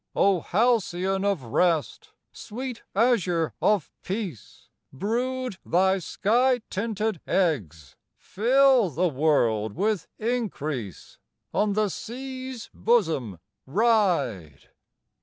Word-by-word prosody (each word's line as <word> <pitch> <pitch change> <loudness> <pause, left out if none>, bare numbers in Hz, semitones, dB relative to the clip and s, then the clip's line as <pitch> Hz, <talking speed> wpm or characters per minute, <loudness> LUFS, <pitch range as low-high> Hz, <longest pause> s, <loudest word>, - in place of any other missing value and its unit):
O 195 -2 +3
halcyon 195 -3 +1
of 200 -8 0
rest, 170 - 0 0.2
Sweet 245 +2 -7
azure 190 -8 +2
of 205 -7 +2
peace, 190 - -6 0.2
Brood 245 - -2
thy 190 +2 +2
sky 240 +8 +1
tinted 215 -2 -2
eggs, 95 - -1 0.2
Fill 255 0 +3
the 170 +5 0
world 120 -8 +1
with 205 +1 -1
increase 155 - -4 0.3
On 205 -1 +1
the 210 0 +1
sea's 260 +2 -7
bosom 160 - +1 0.3
ride! 145 - +1
195 Hz, 90 wpm, -25 LUFS, 155-230 Hz, 0.3 s, O